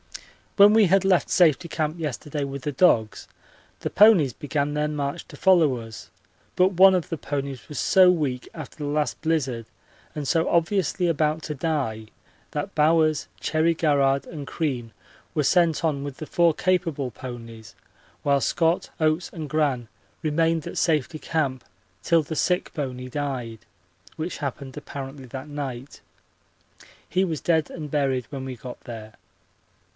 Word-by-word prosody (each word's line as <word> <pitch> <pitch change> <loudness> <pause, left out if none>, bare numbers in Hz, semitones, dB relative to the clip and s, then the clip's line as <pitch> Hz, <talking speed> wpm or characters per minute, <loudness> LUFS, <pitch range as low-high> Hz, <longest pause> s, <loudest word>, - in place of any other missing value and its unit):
When 205 +1 +8
we 220 -3 +5
had 190 +2 +3
left 185 -3 +3
Safety 170 -2 +3
Camp 155 +1 -2
yesterday 150 0 -3
with 140 -1 -5
the 150 - -1
dogs, 120 -9 +2 0.5
the - - -2
ponies 185 - +5
began 145 +3 -2
their 150 0 0
march 145 -1 -3
to - - -11
follow 165 -9 +4
us, 115 -1 -10 0.5
but 185 +2 +4
one 190 +2 +7
of 180 - -1
the 165 - -3
ponies 140 -2 -5
was 150 - -5
so 185 -1 +6
weak 145 -8 -1
after - - -9
the 145 -2 -4
last 150 0 -1
blizzard 135 -8 -1 0.5
and 150 -2 -4
so 165 +1 +2
obviously 175 +1 +1
about 155 -1 0
to 150 - -4
die 135 -8 -2 0.4
that 150 +7 -4
Bowers, 155 0 +3
Cherry 160 +1 +1
Garrard, 140 -4 +2
and 150 -4 -7
Crean 130 -8 -3 0.4
were 150 - +2
sent 170 +1 +3
on 140 -3 0
with 140 -2 -6
the 155 - -6
four 170 +1 +3
capable 165 -8 0
ponies, 115 -2 -9 0.5
while 140 -1 +2
Scott, 165 +1 +1
Oates, 155 +2 +1
and 160 -3 -6
Gran 140 -6 0 0.3
remained 160 0 +1
at - - -6
Safety 155 -3 0
Camp 140 -7 -1 0.4
till 165 -2 +3
the 160 +2 -5
sick 180 +4 0
pony 130 -4 -4
died, 130 -5 -4 0.6
which 165 +2 -4
happened 140 -2 -5
apparently 135 -1 -7
that 130 +3 -7
night. 140 -3 -6 1.1
He 185 +4 +1
was 165 -6 -2
dead 160 -3 +1
and 150 -3 -7
buried 135 -4 0
when 135 -2 -5
we 130 -1 -5
got 125 +1 -9
there. 110 -2 -9
150 Hz, 155 wpm, -24 LUFS, 135-165 Hz, 1.1 s, When